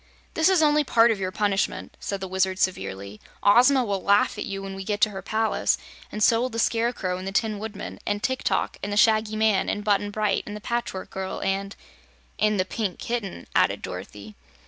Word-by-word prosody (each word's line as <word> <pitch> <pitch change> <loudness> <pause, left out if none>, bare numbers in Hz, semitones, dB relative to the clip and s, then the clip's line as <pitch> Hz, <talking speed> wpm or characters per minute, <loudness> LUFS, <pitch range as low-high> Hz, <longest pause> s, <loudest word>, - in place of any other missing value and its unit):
"This 320 +3 +3
is 365 -4 +4
only 300 0 +4
part 235 -3 +4
of 215 - -2
your 185 -1 -2
punishment," 200 -1 -1
said 200 -1 -4
the 190 - -3
Wizard, 190 0 0
severely. 100 - -3 0.2
"Ozma 250 +6 +6
will 200 -3 -2
laugh 200 +1 +3
at - - -5
you, 195 -1 -5
when 195 0 -6
we 195 0 -6
get 205 +1 -2
to 215 - +4
her 190 -1 -6
palace, 220 +3 +1 0.3
and 210 - -2
so 230 +2 +5
will 255 - 0
the 230 - -6
Scarecrow, 225 -5 0
and 185 - -6
the - - -3
Tin 215 0 0
Woodman, 210 -1 -7
and 205 0 -2
Tik 260 -1 -1
Tok, - - 0
and 205 - -4
the 205 - -1
Shaggy 215 0 +3
Man, 215 -2 +2
and 205 - -2
Button 205 -1 +1
Bright, 210 0 0
and 210 - -6
the - - -6
Patchwork 235 -4 -4
Girl, 190 0 -4
and 195 +1 -2 0.3
" - - -34
"And 210 -1 +2
the 185 - +2
Pink 200 -2 -3
Kitten," 215 - -4
added - - +2
Dorothy. 100 +3 -8
205 Hz, 215 wpm, -25 LUFS, 190-225 Hz, 0.3 s, Ozma